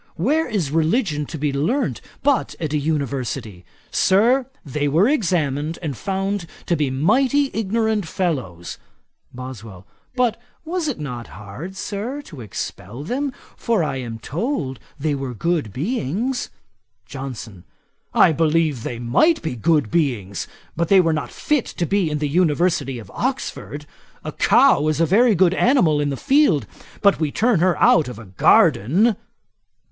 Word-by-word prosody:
Where 295 - +1
is 190 - -1
religion 160 - +1
to 160 - -6
be 145 -1 -1
learnt 215 - 0 0.2
but 285 -3 +1
at 155 -3 -3
an 150 - +2
University? 135 - -3 0.3
Sir, 235 +7 +3 0.2
they 145 +1 -1
were 165 +9 +3
examined, 165 - 0
and 145 -4 -3
found 195 - -2 0.2
to 170 - +1
be 150 -4 0
mighty 265 - +2
ignorant 220 -2 0
fellows.' 130 - -3 0.5
BOSWELL. 115 -7 -9 0.3
'But, 245 -2 +1 0.2
was 340 0 -2
it 280 - -3
not 125 -5 -6
hard, 115 - -8
Sir, 215 +9 -4
to 150 - -11
expel 110 +3 -6
them, 270 - -2 0.2
for 230 -7 0
I 135 -3 -2
am 120 -3 -5
told 140 - -3 0.2
they 150 +1 0
were 135 -3 -4
good 160 - -1
beings?' 215 - -2 0.6
JOHNSON. 120 -7 -8 0.5
'I - - +6
believe 155 -4 +1
they 120 - -4
might 125 - +3
be 160 -6 -3
good 150 -2 +1
beings; 120 - -1 0.3
but 170 +1 0
they 195 +2 +6
were 165 -3 +3
not 155 - -3
fit 295 -5 -1
to 170 - -3
be 195 -1 +1
in 150 - -1
the 150 0 -1
University 160 -3 +1
of 115 - -10
Oxford. 245 - -3 0.4
A - - -4
cow 145 +2 +4
is 155 0 0
a 165 - +4
very 220 +6 +4
good 185 0 +4
animal 185 - +3
in 145 - 0
the 135 - -3
field; 265 - +3 0.4
but 200 -4 +4
we 155 -3 0
turn 225 0 +2
her 175 -1 +2
out 155 - +4
of 125 -3 -7
a 115 - -10
garden.' 150 - +4
160 Hz, 155 wpm, -21 LUFS, 135-205 Hz, 0.6 s, I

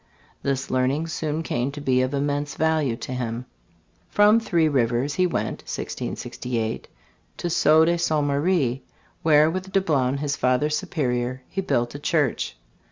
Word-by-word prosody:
This 135 0 -2
learning 130 +5 +1
soon 155 0 -2
came 125 -2 -1
to 145 - -6
be 130 -3 +2
of 130 0 0
immense 145 0 -1
value 155 -6 +1
to 125 - -6
him. 120 -1 -3 0.6
From 210 +2 +5
Three 170 -8 +2
Rivers 130 0 +1
he 185 -1 +2
went - - -2
(1668) 115 -3 -4 0.5
to 175 - -2
Sault 160 +1 +5
de 170 +1 +1
Ste. 170 - 0
Marie, 140 -3 +1 0.4
where 155 -1 +5
with 185 +3 -3
Dablon, 145 -9 +1
his 145 0 -1
Father 130 +4 +1
Superior, 130 -6 -1
he 195 - -3
built 120 -9 0
a 145 - -6
church. 145 - 0
145 Hz, 150 wpm, -24 LUFS, 130-160 Hz, 0.6 s, From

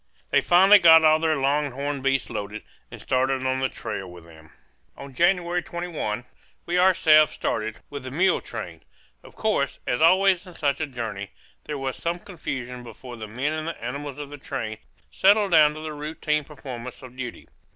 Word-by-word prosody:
They - - +4
finally 190 +4 +7
got 160 -2 +8
all 155 0 +5
their 160 -1 +1
longhorned 140 0 -1
beasts 135 -1 0
loaded 105 +1 -5 0.3
and - - -10
started 130 0 0
on 130 0 0
the 130 0 0
trail 95 -2 -6
with 90 -1 -12
them. 80 -1 -17 0.5
On 140 -1 -10
January 175 +2 +2
21 165 -11 -4 0.4
we 175 +1 0
ourselves 160 -5 +5
started, 110 0 -3
with 140 -1 -6
the 130 - -7
mule 180 +8 +2
train. - - -7 0.4
Of - - -16
course, 140 -11 0
as 125 - -1
always 185 +2 +4
in 180 - -12
such 145 -1 -1
a 155 - -1
journey, 110 -7 -5 0.4
there 150 - -4
was 135 -1 -3
some 170 +1 -2
confusion 130 -9 -6
before 120 +1 -10
the 110 -2 -7
men 130 +8 -2
and 155 0 -4
the 165 - -5
animals 140 +3 -5
of 145 -1 -7
the 145 - -9
train 115 -6 -5 0.3
settled 200 0 +4
down 150 -2 +6
to 155 - -7
the 155 -1 -5
routine 150 0 -2
performance 130 -4 -9
of 125 -1 -11
duty. 125 -2 -7
145 Hz, 180 wpm, -24 LUFS, 125-165 Hz, 0.5 s, got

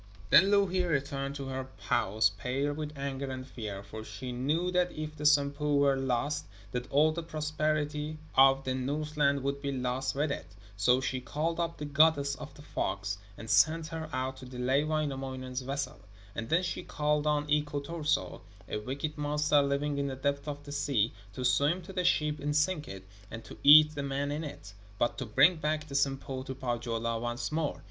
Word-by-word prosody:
Then 190 +6 +8
Louhi 195 -3 +3
returned 140 -3 -1
to 135 -2 -5
her 130 0 -4
house 105 +1 +2
pale 135 +7 -1
with 150 0 -6
anger 140 0 -3
and 130 0 -5
fear, 105 -6 -6
for 110 +1 -8
she 110 +4 -7
knew 150 +9 0
that 180 0 +2
if 155 0 -6
the 150 0 +1
Sampo 145 0 +3
were 140 -1 +4
lost 135 +3 -1 0.2
that 125 +1 -4
all 150 +3 +4
the 170 +2 -3
prosperity 155 -1 -2 0.2
of 135 0 +6
the 130 - -1
Northland 140 +1 0
would 140 0 -2
be 140 - -2
lost 130 0 -2
with 145 +1 0
it. 85 - -6 0.2
So 125 +6 +3
she 130 -1 -2
called 155 +7 -2
up 170 0 -1
the 150 - -5
goddess 145 -1 +4
of 150 +2 -8
the 145 - -13
fogs, 100 -4 -3 0.2
and 115 - -9
sent 155 +9 +4
her 160 -1 -5
out 130 0 -2
to 130 - -10
delay 130 +3 +1
Wainamoinen's 135 -4 -2
vessel. 135 0 -4 0.3
And 115 +2 -5
then 170 +3 +3
she 180 - -3
called 150 0 0
on 150 0 +2
Iko 150 -1 0
Turso 150 - -1 0.3
a - - -3
wicked 140 +7 -4
monster 150 0 +3
living 140 +1 0
in 140 - 0
the 135 - -3
depths 140 +2 -1
of 145 -1 -5
the 145 - -9
sea 125 -6 +1 0.2
to 125 +3 -4
swim 145 +8 +2
to 190 +3 -10
the 180 -1 -1
ship 150 -3 +2
and 145 +1 -2
sink 150 0 +1
it, 95 -1 -9 0.2
and 115 +1 -7
to - - -10
eat 150 +1 +9
the 145 - -3
men 140 +1 -2
in 150 +2 -3
it, 120 -9 -8 0.2
but 120 +2 0
to 130 - -4
bring 140 +11 +5
back 155 0 -1
the 140 - -9
Sampo 135 -1 0
to 130 0 -6
Pohjola 115 -2 -2
once 120 +4 -3
more. 155 -1 -1
140 Hz, 195 wpm, -30 LUFS, 130-150 Hz, 0.3 s, eat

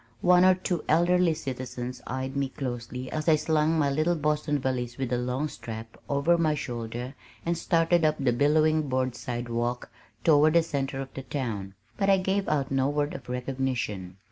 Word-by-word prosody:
One 180 0 +6
or 185 0 +6
two 180 -3 -2
elderly 175 +1 +4
citizens 125 -2 -5
eyed 130 +1 -3
me 140 -1 0
closely 125 -1 -5
as 155 +1 -1
I 155 - +7
slung 155 +1 +1
my 145 -3 +2
little 155 +5 +1
Boston 150 -1 0
valise 125 -3 -2
with 130 -2 -2
a - - +2
long 125 +4 -1
strap 115 -5 -8
over 155 +5 +3
my 155 -2 +2
shoulder 120 -1 -5 0.3
and 170 0 +1
started 165 0 +2
up 155 -1 +3
the 130 -3 +2
billowing 155 +3 +3
board 130 -1 0
sidewalk 120 0 -3 0.3
toward 155 -1 +5
the 170 -1 +5
center 135 -4 -2
of 135 - -8
the 135 - -5
town, 115 -8 -4 0.2
but 200 -1 +1
I 195 - +6
gave 190 +1 0
out 140 -3 0
no 135 0 +2
word 145 0 -1
of 135 - -9
recognition. 125 -7 -3
140 Hz, 180 wpm, -27 LUFS, 125-155 Hz, 0.3 s, I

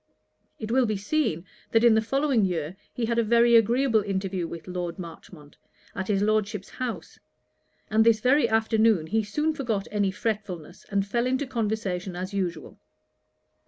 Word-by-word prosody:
It 220 0 -5
will 255 0 +3
be 215 -1 -1
seen, 200 - -1 0.3
that 225 0 +4
in 235 -2 +7
the 220 - +3
following 270 0 +1
year 170 -2 -2 0.2
he 240 - -2
had 235 +1 0
a - - +3
very 235 +1 +4
agreeable 230 +1 +4
interview 190 -3 -2
with 165 +1 -9
Lord 180 -2 -4
Marchmont, 165 -3 -11 0.4
at 190 - -4
his 200 -1 +1
Lordship's 210 -1 0
house; 250 -3 -6 0.7
and 220 +1 +3
this 225 -1 +4
very 265 +6 +3
afternoon 220 -5 +3
he 220 +7 +1
soon 300 +10 -1
forgot 225 -9 -2
any 205 -2 +1
fretfulness, 190 -5 -5
and 200 -1 0
fell 235 +4 0
into 260 +3 0
conversation 210 -7 -2
as 185 +3 -5
usual. 175 -5 -4
215 Hz, 160 wpm, -26 LUFS, 190-235 Hz, 0.7 s, in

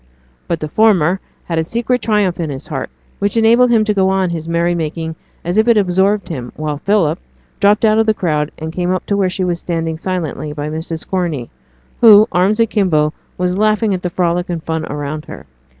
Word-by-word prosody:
But 170 - -1
the 155 - -2
former 190 -2 +3 0.2
had 165 -2 -2
a - - +1
secret 235 +7 -1
triumph 210 -6 +1
in 165 -3 -2
his 135 -2 -6
heart 135 -5 -4 0.3
which 200 +3 0
enabled 235 +2 +5
him 230 -2 +4
to 215 -1 0
go 190 -1 +2
on 190 -1 +1
with - - -4
his 165 -1 -5
merry 170 +1 +1
making 160 0 -3 0.3
as 175 +5 +1
if 220 - +3
it 235 -2 +5
absorbed 195 +1 +2
him; 125 -7 -5
while 150 -2 -3
Philip 180 -3 +1 0.4
dropped 205 +2 +4
out 215 0 +4
of 225 - +2
the 220 - +3
crowd 150 -5 0
and 160 +1 -6
came 180 0 -1
up 185 0 -1
to 200 - 0
where 195 -2 +1
she 185 +1 -3
was 175 -2 -1
standing 165 -2 -3
silently 165 -5 -3
by 150 0 -4
Mrs. 160 +1 -5
Corney, 170 -10 -2 0.5
who, 215 -2 +8
arms 190 +5 +2
akimbo, 185 -9 +2 0.2
was 180 +1 -1
laughing 215 0 +2
at 185 - -2
the 180 - -2
frolic 175 0 -1
and 170 -2 -3
fun 160 -1 -3
around 145 +1 -4
her. - - -10
180 Hz, 215 wpm, -16 LUFS, 160-205 Hz, 0.5 s, who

